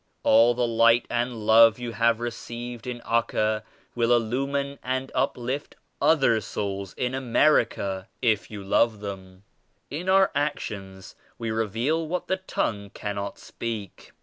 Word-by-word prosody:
All 115 +2 +5
the 125 0 +1
Light 115 +1 +4
and 120 -2 -2
Love 115 0 +7
you 120 -1 -5
have 115 +1 +2
received 120 0 -6
in 120 -1 -5
Acca 110 -2 0 0.3
will 120 0 +1
illumine 140 +4 -1
and 130 +1 -3
uplift 130 +1 -2 0.3
other 135 -7 +4
souls 100 -2 -4
in 125 0 -2
82 - - -1
America 115 -7 +2
if 110 -4 +1
you 105 -2 -7
love 110 +2 +2
them. 95 -2 -8 0.5
In 170 +6 -3
our 190 0 +5
actions 100 -10 -4 0.2
we 115 -1 -3
reveal 115 +9 0
what 180 +3 -2
the 190 - 0
tongue 105 - -3
cannot 100 -1 -4
speak. 110 -5 -7
115 Hz, 140 wpm, -25 LUFS, 105-130 Hz, 0.5 s, Love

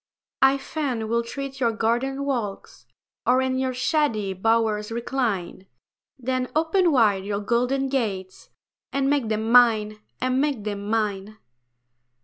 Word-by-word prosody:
I 270 +1 +5
fain 270 -6 -3
would 235 0 0
tread 275 +1 -6
your 235 -3 +2
garden 245 +5 -1
walks, 235 -8 -4 0.4
Or 255 +1 +5
in 260 0 0
your 260 0 0
shady 250 - 0
bowers 220 +1 +1
recline; 225 -6 -2 0.5
Then 255 0 -2
open 330 +3 +3
wide 210 -8 +3
your 200 0 -2
golden 250 +5 0
gates, 200 -8 -3 0.4
And 275 0 +1
make 275 -6 +1
them 220 +1 -1
mine, 220 -3 +5 0.2
and 255 +1 +1
make 280 -7 -1
them 205 -1 -4
mine. 215 -1 -1
235 Hz, 130 wpm, -24 LUFS, 215-270 Hz, 0.5 s, I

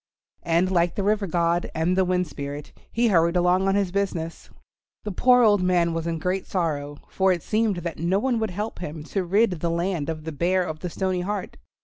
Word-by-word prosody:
And 170 +3 +1
like 175 -1 +2
the 200 - -1
River 205 0 +1
God 170 0 0
and 165 +3 +1
the 190 - +3
Wind 180 0 +1
Spirit 145 -1 -7 0.2
he 235 0 +2
hurried 170 -2 +3
along 180 +2 +3
on 195 - +2
his 200 -3 +1
business. 180 -4 -3 0.5
The 210 - -4
poor 250 +6 +4
old 205 -3 +4
man 175 -2 +2
was 165 0 -3
in 165 -1 -1
great 180 +4 -2
sorrow, 145 -5 -2
for 190 0 +2
it 175 -3 -1
seemed 215 -2 +1
that 170 -3 -5
no 170 +4 +1
one 240 +2 0
would 220 -1 -1
help 210 +5 -5
him 155 -3 -6
to 190 +4 -2
rid 190 0 +2
the 170 - -1
land 170 -2 -1
of 155 -1 -4 0.2
Bear 185 +2 +2
of 160 -3 -5
the 180 - -4
Stony 185 +1 -1
Heart. 200 +1 -4
180 Hz, 215 wpm, -24 LUFS, 165-195 Hz, 0.5 s, poor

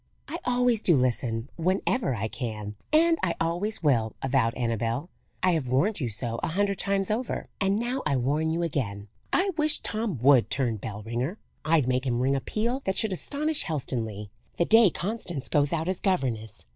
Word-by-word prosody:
"I 335 - -5
always 245 -3 +2
do 170 - +5
listen 120 -2 +1
whenever 185 - 0
I 110 0 -2
can, 110 -3 -5 0.2
and 330 +2 +4
I 170 -2 0
always 175 +5 -1
will," 115 -7 +2
avowed 130 -3 +2
Annabel. 115 - -2 0.3
"I 185 - +5
have 160 -7 0
warned 165 - +1
you 125 -5 -1
so 115 +2 -3
a - - -1
hundred 200 +3 0
times 195 0 0
over, 235 +3 -2
and 195 0 +2
now 245 +4 -1
I 140 - +1
warn 145 +6 +1
you 165 +2 0
again. 105 -11 -3 0.2
I 385 +2 +2
wish 305 -1 +3
Tom 215 - -2
would 135 -3 +6
turn 120 -5 0
bell 105 +1 -6
ringer! 120 - -3 0.3
I'd 155 -4 +3
make 130 +1 0
him 120 -1 +1
ring 135 +2 +2
a 135 - -1
peal 235 - -1
that 190 - 0
should 220 -4 +3
astonish 295 - -1
Helstonleigh, 115 - -3 0.3
the 170 - +3
day 225 0 +7
Constance 175 - -4
goes 145 -2 +2
out 165 0 -1
as 185 -1 -1
governess. 125 - -1
155 Hz, 185 wpm, -27 LUFS, 120-200 Hz, 0.3 s, day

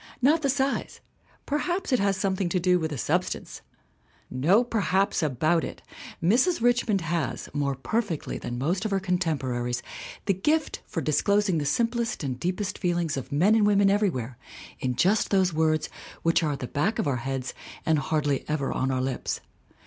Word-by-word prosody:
Not 295 +6 +4
the 280 - +1
size; 270 +1 -1 0.5
perhaps 345 +2 -1
it 250 - +4
has 200 -1 +1
something 190 -1 0
to 180 - +1
do 180 0 +3
with 160 -1 -2
the 145 - -4
sub - - +1
stance! - - -7 0.7
No 170 - +4
perhaps 200 -5 +1
about 155 +3 +1
it! - - -7 0.4
Mrs. 250 - +3
Richmond 235 -4 +2
has, 165 -4 -2
more 140 -2 0
perfectly 190 - -2
than 120 - -5
most 170 +9 0
of 215 - -1
her 195 -1 +1
contemporaries, 135 -10 -1 0.4
the 195 - +3
gift 300 - 0
for 165 - -3
disclosing 190 +5 +2
the 145 - -2
simplest 230 - 0
and 130 -3 -3
deepest 190 +5 -2
feelings 175 -4 0
of 135 +1 -6
men 175 +9 +4
and 215 -2 +4
women 200 -1 +4
everywhere 135 - 0 0.4
in 125 -1 -1
just 200 - +2
those 190 -3 +2
words 155 -1 +1 0.4
which 165 +1 +3
are 155 -3 0
at 140 - -7
the 125 - -3
back 180 - 0
of - - 0
our 135 -3 +1
heads 130 +1 -3 0.3
and 160 -2 +3
hardly 145 -1 0
ever 150 -3 -1
on 130 - 0
our 130 -1 0
lips. 130 -1 -2
175 Hz, 180 wpm, -26 LUFS, 145-205 Hz, 0.7 s, Not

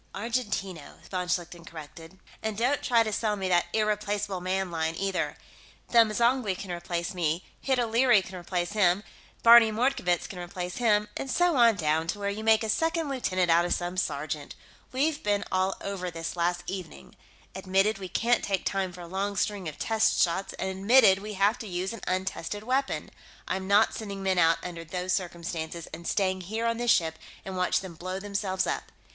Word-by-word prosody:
"Argentino," 205 - -3
von 180 -1 -2
Schlichten 175 -1 -2
corrected. 165 +2 -11 0.2
"And 220 -2 -3
don't 255 +5 +1
try 235 -2 +3
to 215 -1 -3
sell 210 0 0
me 190 -2 -3
that 175 -1 +3
Irreplaceable 210 -3 -1
Man 185 0 -1
line, 160 -1 -1
either. 195 +1 -2 0.5
Them 230 -2 +6
M'zangwe 235 -3 +1
can 190 -1 -7
replace 170 0 -3
me, 170 -1 -1
Hid 265 -2 0
O'Leary 235 -2 +4
can 185 - -10
replace 175 0 -3
him, 200 -2 +3 0.4
Barney 230 -1 +8
Mordkovitz 215 -7 +1
can 185 - -8
replace 180 0 -5
him, 210 -3 +3
and 270 - -4
so 350 +2 +2
on 235 -3 +6
down 160 -2 0
to 195 - -2
where 200 0 -2
you 215 +2 -5
make 220 0 +4
a 220 - -2
second 325 +5 0
lieutenant 185 -10 0
out 170 +1 +5
of 175 - +1
some 175 +1 -4
sergeant. 150 -4 -3 0.4
We've 285 +4 0
been 205 0 +1
all 185 +1 +1
over 195 -2 -4
this 165 0 -5
last 175 0 0
evening. 180 - -7 0.4
Admitted 195 +2 +1
we 190 -2 -6
can't 240 +5 +1
take 195 -2 -1
time 195 -2 -1
for 180 0 -11
a 170 - -8
long 195 +3 -2
string 195 -3 -1
of 150 - -11
test 220 -1 +2
shots, 185 +3 +1
and 190 - -3
admitted 195 +1 +5
we 210 +1 -6
have 205 +5 +2
to 225 - -6
use 185 +2 -3
an 230 - -8
untested 185 +2 -2
weapon; 265 +4 -1 0.4
I'm 190 0 -2
not 205 +3 +4
sending 200 -3 -6
men 190 -2 +2
out 165 -1 +5
under 170 -2 -6
those 180 +2 -3
circumstances 170 -2 -4
and 170 +1 -7
staying 185 -2 0
here 220 +6 -3
on 230 0 +1
this 240 0 -1
ship 160 -6 +3 0.3
and 190 - -5
watch 180 0 +1
them 190 -3 -8
blow 185 +3 -5
themselves 195 -2 -1
up. - - -3
190 Hz, 190 wpm, -28 LUFS, 175-220 Hz, 0.5 s, Barney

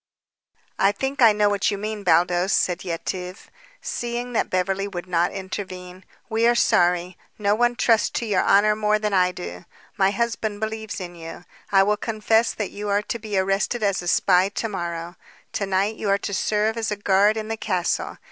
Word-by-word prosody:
"I 195 - +4
think 270 +6 -3
I 230 -2 +8
know 210 0 +2
what 205 -1 +1
you 200 - -2
mean, 210 0 -5
Baldos," 175 +2 +3
said 180 -1 +1
Yetive, 180 +1 -5 0.3
seeing 240 +1 -4
that - - 0
Beverly 195 +2 -1
would 175 -3 -6
not 175 -1 +1
intervene. 185 -1 -7 0.2
"We 225 +1 +2
are 240 - +4
sorry. 175 -3 +2 0.2
No 205 -1 +1
one 240 +2 +2
trusts 230 -2 +3
to 235 - -3
your 205 -4 +1
honor 210 +2 +4
more 210 0 +2
than 210 -1 -2
I 180 -1 +3
do. 90 - -8 0.3
My 190 0 +4
husband 220 -1 -2
believes 220 -1 -4
in 175 -2 -7
you. 165 +1 -10 0.3
I 195 -1 +6
will 210 +1 +1
confess 220 +1 +1
that 210 -3 -3
you 205 0 -5
are 200 +1 +1
to 235 - -4
be 210 -2 -3
arrested 195 +5 0
as 200 -2 +1
a 175 - -7
spy 185 +1 +3
to 215 +3 -3
morrow. 175 -3 -5 0.4
To 200 - -2
night 195 +3 0
you 210 - -2
are 200 - +4
to 200 - -5
serve 215 +3 0
as 225 -1 -1
a 210 - -1
guard 205 +1 +3
in 215 0 -4
the 225 - -2
castle. 185 -5 -2
200 Hz, 195 wpm, -23 LUFS, 185-215 Hz, 0.4 s, I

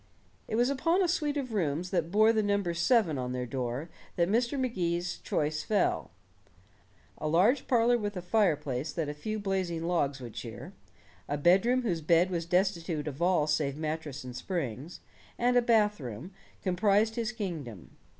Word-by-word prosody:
It - - -2
was 245 +4 +3
upon 330 +7 +2
a - - +2
suite 300 -4 0
of 255 -5 -3
rooms 175 -2 -1
that 170 -4 0
bore 215 +4 +5
the 220 - +2
number 200 -4 0
seven 170 - +2
on 125 0 -3
their 125 0 -2
door 125 +3 -3 0.3
that 170 -1 +2
Mr. 240 +5 +1
Magee's 175 -8 -1
choice 155 +1 -1
fell. 210 -2 0 1.1
A 155 - -2
large 195 - +3
parlor 240 -1 +3
with 205 -2 -3
a - - -3
fireplace 155 - 0
that 160 -4 -2
a - - -3
few 215 +9 -4
blazing 190 -5 -2
logs 145 -5 0
would 120 -3 -8
cheer, 115 0 -8 0.6
a 145 - 0
bedroom 195 - +3
whose 175 -8 -1
bed 170 +3 +3
was 170 -2 -2
destitute 170 -4 0
of 145 +2 -6
all 175 -4 +3
save 150 -2 0
mattress 155 -3 -4
and 125 -1 -8
springs, 145 - -4 0.4
and 245 +1 +2
a 245 - +6
bathroom, 205 - 0 0.3
comprised 205 +4 +2
his 230 -1 -2
kingdom. 160 - -6
175 Hz, 170 wpm, -30 LUFS, 150-215 Hz, 1.1 s, a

